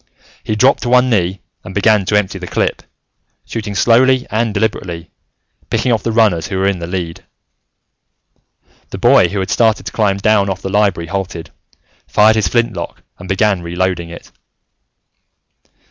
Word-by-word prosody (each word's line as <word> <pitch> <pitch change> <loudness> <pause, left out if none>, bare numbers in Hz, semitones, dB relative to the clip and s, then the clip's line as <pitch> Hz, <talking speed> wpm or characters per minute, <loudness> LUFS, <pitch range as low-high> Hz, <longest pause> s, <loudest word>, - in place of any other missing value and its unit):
He 110 - -2
dropped 130 +6 +3
to 120 - -2
one 125 0 +4
knee 95 -2 0 0.2
and 95 - -10
began 105 -1 +3
to 105 - 0
empty 105 -3 -2
the - - -7
clip, - - -1 0.6
shooting 105 -3 -5
slowly 125 +5 +3
and 115 +1 0
deliberately, 90 -5 -3 0.6
picking 125 - 0
off 115 -3 +1
the 115 - -2
runners 105 -8 +2
who 95 - -4
were 95 - 0
in 100 -2 0
the 85 - -5
lead. 85 -2 -5 1.7
The - - -6
boy - - +5
who 100 - -5
had 95 +1 -3
started 110 -2 +2
to - - -5
climb 100 -3 +1
down 100 0 +2
off 95 0 -4
the 95 - -3
Library 95 -5 0
halted, 90 -3 -5 0.6
fired 110 +1 +4
his 110 -5 +1
flintlock, 115 -3 -2 0.2
and 90 - -10
began 100 -1 +1
reloading 85 0 -2
it. 85 - -12
100 Hz, 160 wpm, -16 LUFS, 90-110 Hz, 1.7 s, boy